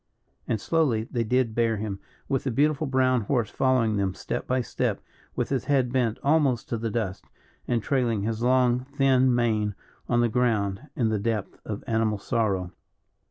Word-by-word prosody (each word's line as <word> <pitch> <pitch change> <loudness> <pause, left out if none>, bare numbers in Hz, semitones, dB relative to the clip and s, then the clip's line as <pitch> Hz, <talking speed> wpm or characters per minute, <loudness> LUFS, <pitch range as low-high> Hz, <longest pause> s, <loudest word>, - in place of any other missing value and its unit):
And 110 - 0
slowly 135 -6 +1
they 115 +1 -2
did 125 0 +1
bear 115 -1 +1
him, 100 -2 -4 0.3
with 135 - 0
the - - +1
beautiful 150 +4 +1
brown 130 -2 +2
horse 115 +1 0
following 125 -5 +2
them 95 -2 -1
step - - -4
by 130 0 +1
step - - -2 0.4
with - - -1
his 135 -3 -1
head 130 -4 +1
bent 120 -4 +1
almost 140 -5 +2
to 115 - -2
the 115 0 -2
dust, 100 -4 -3 0.4
and 115 -3 0
trailing 120 -7 0
his 110 +1 -2
long, 125 0 +3
thin 130 -1 +2
mane 110 -4 +1 0.3
on 120 -1 +3
the 120 - +3
ground, 110 -1 0
in 115 -4 +1
the 110 -1 0
depth 110 -1 -2
of 105 -1 -5
animal 110 -2 +1
sorrow. 100 -4 -1
120 Hz, 175 wpm, -26 LUFS, 110-130 Hz, 0.4 s, long